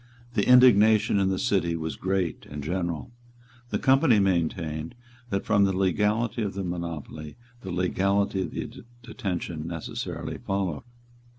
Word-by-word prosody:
The 105 -3 +1
indignation 110 -5 +6
in 95 -1 +2
the 95 - 0
City 90 -4 +1
was 80 -1 -4
great 95 -3 -2
and 75 0 -7
general. 85 - -3 0.6
The - - 0
Company 135 -4 +4
maintained 80 -4 -1 0.3
that 100 -2 -2
from 100 -2 +3
the 95 -1 +1
legality 105 +5 +1
of 100 -3 -2
the 100 - -3
monopoly 85 -4 -5 0.3
the 95 - -7
legality 95 +2 +1
of 90 - -3
the - - -6 0.2
detention 90 -9 -4
necessarily 85 -2 -5
followed. 95 -5 -2
95 Hz, 135 wpm, -26 LUFS, 85-100 Hz, 0.6 s, indignation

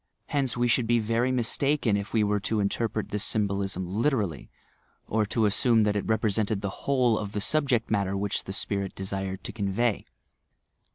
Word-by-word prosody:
Hence 135 -4 0
we 120 0 +2
should 120 -1 +2
be 120 +1 +4
very 115 +3 +1
mistaken 130 -1 +1
if 100 0 -3
we 110 -2 +2
were 105 0 +1
to 110 +2 -1
interpret 110 +1 -1
this 105 0 -2
symbolism 100 -4 -1
literally, 105 - -1 0.6
or 110 -1 0
to 115 +1 +1
assume 110 +2 +4
that 105 -1 +1
it 105 - -2
represented 110 -2 +1
the 100 - -2 0.2
whole 125 -5 +3
of 105 -1 -5
the 105 - -1
subject 125 -1 +1
matter 100 -2 +1
which 100 0 -2
the - - -5
spirit 100 -1 -2
desired 95 0 -4
to - - -5
convey. 110 +1 0
105 Hz, 175 wpm, -27 LUFS, 100-120 Hz, 0.6 s, be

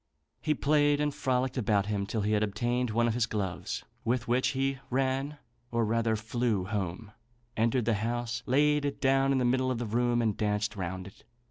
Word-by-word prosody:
He 155 -1 +1
played 145 0 +3
and 150 -1 0
frolicked 130 0 0
about 105 -4 +2
him 100 -1 -2
till 110 +1 -1
he 105 +1 0
had 105 -1 +2
obtained 120 +4 0
one 120 +2 +2
of 115 - +1
his 120 -1 +1
gloves, 100 -4 -3 0.2
with 120 +1 0
which 125 +2 +2
he 135 0 -1
ran 135 +3 0 0.3
or 115 -1 +1
rather 115 0 +1
flew 110 -2 -1
home, 100 +1 -4 0.4
entered 115 +1 +1
the 115 - +2
house, 120 +3 -2
laid 150 +3 +3
it 145 -1 -2
down 135 0 +3
in 135 - +2
the 125 - +1
middle 130 +1 +2
of 130 - -1
the 120 - -3
room, 120 +2 +1
and 110 -3 +1
danced 105 0 -1
round 95 -1 -4
it. 95 - -14
120 Hz, 200 wpm, -29 LUFS, 105-130 Hz, 0.4 s, played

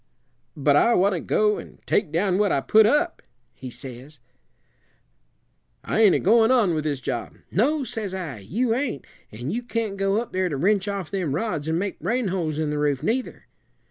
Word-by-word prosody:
'But 145 0 +3
I 235 +10 +4
want 195 +2 +3
to 175 - -1
go 210 +5 +1
and - - -12
take 165 - +1
down 185 +3 +1
what 210 -1 +2
I - - +2
put 215 +9 +5
up,' 325 +7 +1 0.3
he 130 +2 -9
says; 130 +4 -10 1.7
'I 220 - 0
ain't 210 -4 +6
a - - +2
goin' 225 +3 +4
on 235 -9 +3
with 155 -1 -2
this 145 -3 -2
job.' 120 -1 -4 0.2
'No,' 275 - +1
says 220 -6 -5
I, 170 - -5
'you 225 - -1
ain't; 250 - -2 0.3
and 120 - -5
you 240 - -2
can't 230 -4 -3
go 195 +2 +1
up 235 - -5
there 185 0 0
to 145 - -3
wrench 195 +6 +1
off 195 -5 -4
them 175 -8 -1
rods 165 -6 -2
and 160 +1 0
make 195 +1 -3
rain 230 +3 -1
holes 165 -5 -2
in 155 -1 -1
the 150 - -2
roof, 145 -3 0
neither.' 250 +3 -2
190 Hz, 200 wpm, -24 LUFS, 150-220 Hz, 1.7 s, ain't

